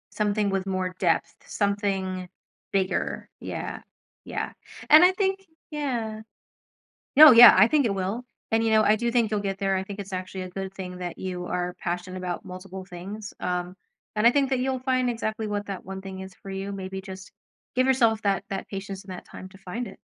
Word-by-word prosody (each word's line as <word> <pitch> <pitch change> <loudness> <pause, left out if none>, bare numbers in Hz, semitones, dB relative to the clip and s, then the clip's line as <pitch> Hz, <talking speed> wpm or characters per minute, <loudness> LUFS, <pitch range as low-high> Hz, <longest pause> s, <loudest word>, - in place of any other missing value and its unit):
Something 210 -1 +1
with 195 0 -1
more 185 -1 -2
depth. 170 -3 +1
Something 195 -3 -1 0.4
bigger, 190 -1 -1
yeah. - - -5 0.4
Yeah. - - -3 0.4
And 310 +4 +9
I 365 - +6
think 385 0 0 0.3
Yeah. 235 -7 -3 0.9
No, 305 -1 +11
yeah, 240 0 +11
I 205 +4 +7
think 290 -3 +3
it 200 - +1
will, 195 +6 -2 0.3
and, 225 0 +3
you 225 - +2
know, 215 0 +5
I 210 +1 +5
do 235 +2 -1
think 230 -3 +2
you'll 210 - +1
get 195 -1 -2
there. 195 -1 +1
I 190 - -1
think 200 +1 -8
it's 195 -1 -7
actually 185 0 -4
a 185 - -7
good 190 +1 -5
thing 180 -2 -7
that 175 -1 -5
you 180 -1 -4
are 180 0 -2
passionate 180 +1 -4
about 180 -1 -4
multiple 185 +1 -8
things, 195 +4 -8
um, 180 0 -2 0.4
and 215 +2 +5
I - - +7
think 275 -1 +2
that 260 - +2
you'll 260 0 0
find 255 -1 +1
exactly 220 -1 -3
what 205 0 -2
that 195 -2 -5
one 190 +1 -6
thing 190 -1 -8
is 190 -1 -9
for 195 - -7
you. 195 +1 -4
Maybe 190 0 -5
just 190 -1 -10 0.4
give 255 +1 +3
yourself 230 -4 +3
that 195 -1 +1
that 195 -1 -4
patience 195 0 -6
and 195 - -10
that 180 - -9
time 185 - -10
to 195 - -16
find 195 +6 -5
it. - - -11
195 Hz, 205 wpm, -26 LUFS, 185-225 Hz, 0.9 s, No